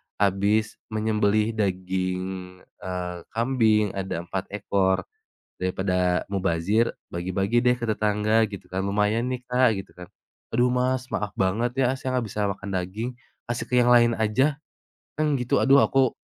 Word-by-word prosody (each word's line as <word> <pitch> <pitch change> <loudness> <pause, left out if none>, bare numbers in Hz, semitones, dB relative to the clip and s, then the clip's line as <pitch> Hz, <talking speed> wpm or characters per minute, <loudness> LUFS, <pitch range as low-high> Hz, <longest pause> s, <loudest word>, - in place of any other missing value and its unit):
habis 100 +2 +1 0.2
menyembelih 110 0 +1
daging," 95 -1 -2
eee, 90 -1 -6 0.2
"kambing 110 -4 +2
ada 95 -3 -3
4 95 +2 -4
ekor, 95 -2 +1 0.6
daripada 90 -1 0
mubazir 95 +3 +1 0.2
bagi-bagi 95 +7 0
deh 125 0 +5
ke 120 - -4
tetangga," 105 +1 +2
gitu 100 -2 -8
kan 95 - -1
"lumayan 105 +4 +1
nih 125 -1 -3
Kak," 125 -3 +3
gitu 95 - -9
kan, 90 -1 -10 0.4
"aduh 120 +2 +3
Mas 125 0 0
maaf 105 -2 -2
banget 110 +6 +1
ya, - - +2
saya 130 -1 -2
gak 120 - -2
bisa 105 -1 0
makan 100 0 -6
daging, 95 +7 -3 0.4
kasih 120 0 -3
ke 125 - +2
yang 120 0 +4
lain 120 -1 +6
aja." 130 +7 +2 0.6
Kan 150 -2 +2
gitu 125 0 +1
aduh 135 +1 +6
aku, 135 -2 +3
105 Hz, 150 wpm, -25 LUFS, 95-120 Hz, 0.6 s, lain